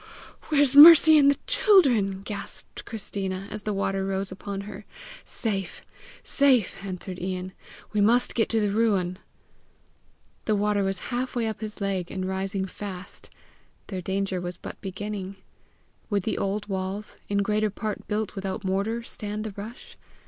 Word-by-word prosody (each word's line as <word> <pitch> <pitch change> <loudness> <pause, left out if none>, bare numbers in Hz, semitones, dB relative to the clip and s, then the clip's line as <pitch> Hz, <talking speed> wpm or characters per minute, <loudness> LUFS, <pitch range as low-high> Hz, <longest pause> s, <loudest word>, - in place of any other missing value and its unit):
"Where's 285 -3 +4
Mercy 315 +1 +10
and 280 -1 +6
the 280 - +2
children?" 250 - +3
gasped 205 -1 -7
Christina, 195 -3 -4
as 215 - -5
the 210 - -3
water 195 -1 -1
rose 195 0 -2
upon 195 +1 -5
her. 205 0 -9 0.4
"Safe, 195 -5 -4 0.4
safe!" 260 -10 +2
answered 185 -1 -6
Ian. 185 0 -4 0.4
"We 210 - +2
must 240 +4 +4
get 225 - +1
to 225 - +2
the 205 -2 +1
ruin!" 195 -4 +1 1.3
The 215 - +2
water 205 0 +1
was 195 0 -1 0.2
halfway 245 -1 -1
up 220 0 -4
his 215 -1 -6
leg, 190 -3 -2
and 185 -1 -4
rising 190 0 -2
fast. 190 -1 -8 0.6
Their 190 -2 -5
danger 190 0 -2
was 175 0 -5
but - - -9
beginning. 195 0 -5 0.7
Would 200 -3 0
the 220 - -2
old 200 +1 -2
walls, 195 +1 -4
in 200 0 +1
greater 215 +1 +1
part 210 +1 -5
built 210 0 -2
without 195 +1 -4
mortar, 200 +5 -1
stand 210 -2 -4
the 215 -2 -6
rush? 215 +4 -9
200 Hz, 150 wpm, -26 LUFS, 190-220 Hz, 1.3 s, Mercy